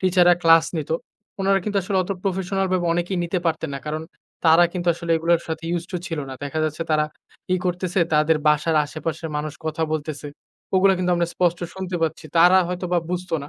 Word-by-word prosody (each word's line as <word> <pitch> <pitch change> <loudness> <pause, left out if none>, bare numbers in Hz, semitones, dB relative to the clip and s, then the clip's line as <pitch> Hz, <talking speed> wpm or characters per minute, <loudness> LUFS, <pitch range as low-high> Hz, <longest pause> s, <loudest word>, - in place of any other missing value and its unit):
Teacher 185 -1 +4
রা 175 - +7
class 165 0 +6
নিতো। 155 +1 -2 0.5
উনারা 195 0 +3
কিন্তু 205 -1 -2
আসলে 190 +1 -2
অত 185 - -8
প্রফেশনাল 190 0 -1
ভাবে 175 -2 +1
অনেকেই 175 +2 -1
নিতে 175 +2 -1
পারতেন 160 -2 -1
না। - - -3
কারণ 155 +1 -3 0.4
তারা 165 +2 +7
কিন্তু 175 -1 -2
আসলে 170 0 -6
এগুলোর 165 +1 +2
সাথে 160 0 -4
used 170 +1 -6
to - - 0
ছিল 165 -2 -4
না। 130 - -6
দেখা 145 +3 -3
যাচ্ছে 155 +1 -2
তারা 155 0 +3 0.5
ই - - +2
করতেছে 180 +1 -1
তাদের 155 +1 +4
বাসার 150 +2 +2
আশেপাশের 160 +2 -5
মানুষ 150 0 -3
কথা 155 +1 -2
বলতেছে। 150 -1 -4 0.5
ওগুলা 195 +1 +5
কিন্তু 180 0 0
আমরা 170 0 +1
স্পষ্ট 175 -1 +1 0.2
শুনতে 185 -1 -4
পাচ্ছি। 160 -1 -2
তারা 180 +3 +7
হয়তো 180 0 -3
বা 175 - +4
বুঝত 180 0 -3
না। 145 - -8
170 Hz, 205 wpm, -22 LUFS, 160-180 Hz, 0.5 s, রা